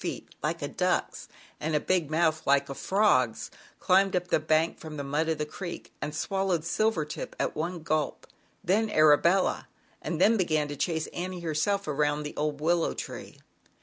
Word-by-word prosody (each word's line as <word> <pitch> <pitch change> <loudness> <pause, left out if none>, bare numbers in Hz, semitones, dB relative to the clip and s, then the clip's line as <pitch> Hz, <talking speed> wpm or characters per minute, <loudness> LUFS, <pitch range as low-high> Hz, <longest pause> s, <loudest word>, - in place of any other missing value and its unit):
67 - - -3
feet - - -23
like - - -2
a - - -1
duck's - - -1 0.3
and 155 +1 -1
a - - +3
big 175 -2 0
mouth 160 0 +2
like 140 0 +3
a - - -3
frog's, 135 - +1 0.3
climbed 190 +1 +3
up 180 0 -1
the - - +3
bank 155 +1 +1
from 155 -2 -8
the 140 - -3
mud 150 +4 -1
of 160 - 0
the 150 - -2
creek 170 +3 -7
and 150 - -4
swallowed 190 -2 -1
Silver 215 -3 +1
tip 150 - -7
at - - -1
one 170 +1 -3
gulp, 155 -2 -1 0.4
then 215 +5 +2
Arabella, 160 +3 +4 0.3
and 165 - -3
then 225 +5 +5
began 155 -6 +1
to 145 - -4
chase 160 +1 -1
Annie, 180 0 -4
herself, 170 +5 0
around 150 0 0
old 150 -1 -2
willow 165 +2 +1
tree. - - -7
160 Hz, 180 wpm, -28 LUFS, 150-180 Hz, 0.4 s, then